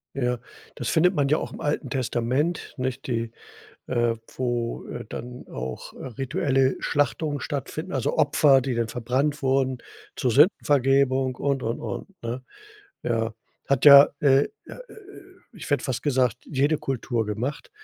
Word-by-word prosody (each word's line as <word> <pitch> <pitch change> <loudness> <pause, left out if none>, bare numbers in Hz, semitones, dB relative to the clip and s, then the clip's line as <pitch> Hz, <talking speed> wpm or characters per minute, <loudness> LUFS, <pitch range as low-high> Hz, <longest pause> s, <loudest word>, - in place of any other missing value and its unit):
Ja, 125 -3 -1 0.3
das - - -4
findet 180 +4 +3
man 140 -4 +1
ja 155 - +3
auch - - -5
im - - -9
Alten 150 -2 -2
Testament, 130 +5 -1
nicht, 130 0 -3
die, 115 -2 -2 0.6
äh 120 -2 +1 0.2
wo, 120 -2 -2
äh, - - -6
dann 125 +1 -7
auch, 65 0 -6
äh, - - -9
rituelle 135 -1 +1
Schlachtungen 145 0 0
stattfinden, 145 -3 -4
also - - -1
Opfer, 135 -3 +5
die 130 0 -2
dann 115 -1 0
verbrannt 130 +6 -1
wurden 130 -1 +1 0.4
zur 125 - 0
Sündenvergebung 135 - +3
und, 140 -1 -1
und, 115 +1 -2
und, 110 -4 -5 0.2
ne? 120 +2 -4 0.6
Ja. 115 -1 -1 0.3
Hat 140 +1 +1
ja, 140 0 +10
äh, 140 -1 +4 0.2
ja, - - -9
äh, - - -13
äh 400 -2 -13 0.3
ich 155 - -8
hätte 145 - +2
fast 125 -3 -2
gesagt, 130 -5 +2
jede 145 +2 +1
Kultur 120 -3 -2
gemacht. 115 +8 -4
130 Hz, 155 wpm, -25 LUFS, 120-145 Hz, 0.6 s, ja